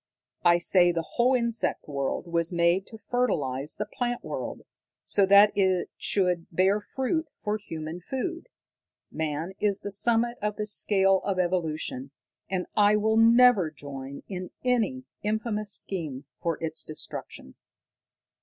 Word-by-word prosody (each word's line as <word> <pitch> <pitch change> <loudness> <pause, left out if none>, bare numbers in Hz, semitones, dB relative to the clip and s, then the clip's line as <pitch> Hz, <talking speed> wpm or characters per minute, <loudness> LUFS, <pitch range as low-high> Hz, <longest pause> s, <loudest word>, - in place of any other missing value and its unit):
I 175 -1 +6
say 175 0 +5
the 165 -1 -2
whole 245 +9 +2
insect 235 -2 -1
world 140 +1 -2
was 170 0 0
made 170 +2 +2
to 220 - -10
fertilize 150 - -1
the 210 - -3
plant 245 +1 -3
world, - - -5 0.4
so 200 -2 +2
that 200 +1 +7
it 190 -2 +1
should 180 -4 +1
bear 190 +4 +2
fruit 290 +8 -2
for 210 +1 -3
human 165 -3 -7
food. 335 - -4 0.6
Man 160 +3 -3
is 205 -1 +1
the 205 - -5
summit 235 +4 +1
of 210 0 -1
the 210 - -3
scale 195 -2 +3
of 195 -2 -1
evolution, 160 -7 -1 0.4
and 185 -1 -1
I 205 0 +5
will 220 +1 +2
never 230 -5 +6
join 140 -2 -8
in 185 -2 -6 0.2
any 250 +1 +1 0.2
infamous 215 -1 -2
scheme 155 -10 -4 0.2
for 165 -2 -1
his 160 -1 -2
destruction." 155 - -8
195 Hz, 140 wpm, -27 LUFS, 165-220 Hz, 0.6 s, that